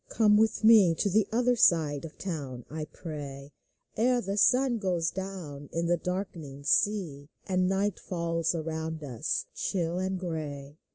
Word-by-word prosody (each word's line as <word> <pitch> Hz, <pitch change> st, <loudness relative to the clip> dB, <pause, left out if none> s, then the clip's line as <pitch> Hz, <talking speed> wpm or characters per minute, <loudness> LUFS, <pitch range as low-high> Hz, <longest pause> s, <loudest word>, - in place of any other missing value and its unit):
Come 210 Hz, -2 st, +4 dB
with 220 Hz, +1 st, +2 dB
me 215 Hz, -7 st, +7 dB
To 200 Hz, +4 st, 0 dB
the 210 Hz, +1 st, +3 dB
other 245 Hz, +2 st, +2 dB
side 155 Hz, -8 st, +3 dB
of 155 Hz, -, -9 dB
the -, -, -31 dB
town, 140 Hz, -10 st, -5 dB
I 155 Hz, 0 st, -4 dB
pray, 145 Hz, -4 st, -8 dB, 0.4 s
Ere 245 Hz, +3 st, +2 dB
the 195 Hz, -3 st, -3 dB
sun 250 Hz, +2 st, +3 dB
goes 180 Hz, -5 st, 0 dB
down 175 Hz, -7 st, -7 dB
in 170 Hz, +1 st, -1 dB
the 175 Hz, +1 st, +3 dB
darkening 175 Hz, -6 st, -5 dB
sea, 155 Hz, -5 st, +1 dB, 0.2 s
And 185 Hz, -1 st, +1 dB
night 195 Hz, 0 st, 0 dB
falls 170 Hz, -1 st, -1 dB
around 160 Hz, -1 st, -4 dB
us, 135 Hz, +2 st, -2 dB
chill 175 Hz, -1 st, -2 dB
and 190 Hz, 0 st, -2 dB
gray. 150 Hz, -4 st, -5 dB
170 Hz, 160 wpm, -29 LUFS, 155-200 Hz, 0.4 s, me